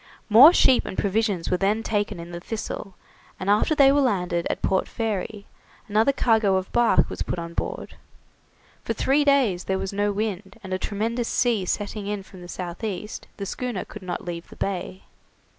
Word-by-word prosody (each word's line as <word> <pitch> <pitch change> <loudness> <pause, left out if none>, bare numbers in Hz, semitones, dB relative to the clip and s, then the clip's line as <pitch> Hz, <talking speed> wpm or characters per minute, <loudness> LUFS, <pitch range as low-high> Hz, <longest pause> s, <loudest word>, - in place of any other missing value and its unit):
More 245 +9 +10
sheep 260 -7 +4
and - - -6
provisions 200 -3 0
were 180 - +2
then 205 +4 +1
taken 205 -5 -1
in 170 +1 -8
the 170 - -6
'Thistle', 195 -1 -6 0.4
and 195 +2 0
after 215 +9 +3
they 275 -2 +6
were 285 +1 +3
landed 180 -8 0
at - - -3
Port 190 - +1
Fairy, 210 -2 -3 0.4
another 220 +5 +3
cargo 220 -7 +2
of 190 0 -2
bark 240 -1 +3
was - - -7
put - - -2
on 170 0 -6
board. 470 - -4 0.9
For - - -2
three 280 +3 +2
days 265 -11 +2
there 190 - 0
was 195 +1 -4
no 205 +1 +1
wind, 200 -2 -4
and 190 -1 -5
a 185 - -1
tremendous 225 +5 -2
sea 230 -6 +1
setting 205 +2 -3
in 205 -1 -3
from 190 -1 -14
the 175 - -10
south 175 +2 -6
east, 210 0 -5
the 200 - -4
schooner 240 -1 -4
could 215 - -10
not 180 -1 -5
leave 170 -1 -6
the - - -13
bay. 190 -1 -4
205 Hz, 190 wpm, -24 LUFS, 185-225 Hz, 0.9 s, More